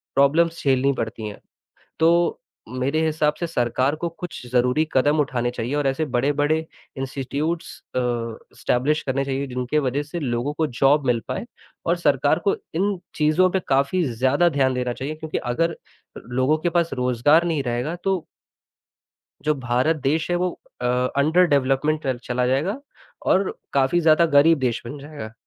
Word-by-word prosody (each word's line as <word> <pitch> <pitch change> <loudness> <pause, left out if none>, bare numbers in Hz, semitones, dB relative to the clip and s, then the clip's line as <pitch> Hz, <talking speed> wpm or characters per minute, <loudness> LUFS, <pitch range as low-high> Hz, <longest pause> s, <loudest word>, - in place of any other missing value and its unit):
Problems 165 +5 +3
झेलनी 135 0 +3
पड़ती 110 -2 -4
हैं। 105 - -8 0.6
तो 170 +1 +3 0.3
मेरे 130 +5 -1
हिसाब 150 -1 +1
से 170 - 0
सरकार 130 -2 0
को 170 - +1
कुछ 175 -8 -7
ज़रूरी 125 +5 +2
कदम 145 +4 +3
उठाने 125 -3 0
चाहिए 120 +2 -4
और 145 -1 0
ऐसे 135 +4 0
बड़े-बड़े 145 +4 +2 0.4
इंस्टीट्यूट्स 140 +5 -3 0.3
अ, - - +3 0.6
एस्टैब्लिश 145 +5 0
करने 135 +1 0
चाहिए 135 +1 -2
जिनके 125 +3 -1
वजह 140 0 0
से 155 +4 -6
लोगों 125 +1 -1
को 160 - +2
जॉब 135 +2 +2
मिल 120 -2 +2
पाए। - - -3 0.4
और - - +2
सरकार - - +2
को 405 +2 +2 0.2
इन 195 +2 0 0.2
चीज़ों 155 +4 +3
पे 190 - 0
काफ़ी 140 +7 +2
ज़्यादा 130 +7 +2
ध्यान 135 -4 +1
देना 125 -1 -1
चाहिए 135 +5 -5
क्योंकि 155 0 -4
अगर 165 +5 0 0.4
लोगों 130 +5 0
के 170 +2 -1
पास 170 -1 +1
रोज़गार 125 +6 +3
नहीं 160 -5 0
रहेगा 125 +6 -2
तो 190 -4 0 1.2
जो 155 - +3
भारत 125 +7 +2
देश 155 +5 0
है - - +2
वो 180 +1 0 0.3
अ, - - -2 0.3
अंडर 160 +6 +4
डेवलपमेंटल 140 +2 +1
टल 125 - -4
चला 125 0 0
जाएगा 155 - 0 0.5
और 190 +1 +2 0.2
काफ़ी 140 +5 +3
ज़्यादा 160 +1 +5
गरीब 160 +1 +6
देश 125 -3 0
बन 120 +5 -6
जाएगा। 140 -6 -8
140 Hz, 165 wpm, -23 LUFS, 130-160 Hz, 1.2 s, गरीब